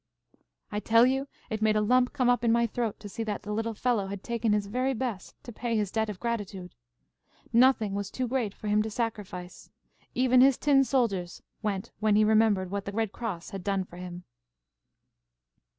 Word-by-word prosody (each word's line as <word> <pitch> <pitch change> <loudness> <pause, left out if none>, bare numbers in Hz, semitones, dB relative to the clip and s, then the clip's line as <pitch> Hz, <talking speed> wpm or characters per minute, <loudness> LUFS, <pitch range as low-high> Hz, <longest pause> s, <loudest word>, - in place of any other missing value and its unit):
"I 210 - -1
tell 230 +2 +5
you 265 +2 0 0.2
it 220 0 -2
made 215 0 +3
a 215 - +3
lump 250 +3 +3
come 260 -4 0
up 245 -1 +3
in 230 - +3
my 235 0 +3
throat 230 -1 -3
to - - -7
see 205 - -6
that 210 -2 -3
the 210 - -5
little 225 +1 -2
fellow 225 -4 0
had 200 0 -6
taken 235 -2 -1
his 210 -1 +1
very 255 +6 -1
best 230 -6 -4
to 240 - -9
pay 230 0 -2
his 205 -3 -1
debt 220 -1 0
of 200 -3 -6
gratitude. 205 -6 -4 0.8
Nothing 235 -4 +4
was 200 0 -3
too 255 -1 -3
great 235 -5 -1
for 215 - -8
him 210 +1 +3
to 220 - -2
sacrifice. 210 -6 -5 0.5
Even 255 0 +4
his 270 -1 +6
tin 275 -2 +4
soldiers 205 -10 -1 0.2
went 210 0 -3
when 215 -1 +3
he 215 - +5
remembered 215 -4 +3
what 200 0 -3
the 200 - -4
Red 220 0 -1
Cross 205 -9 -5
had 195 -2 -6
done 195 -1 0
for 175 -1 -14
him." 180 0 -8
220 Hz, 200 wpm, -28 LUFS, 200-240 Hz, 0.8 s, his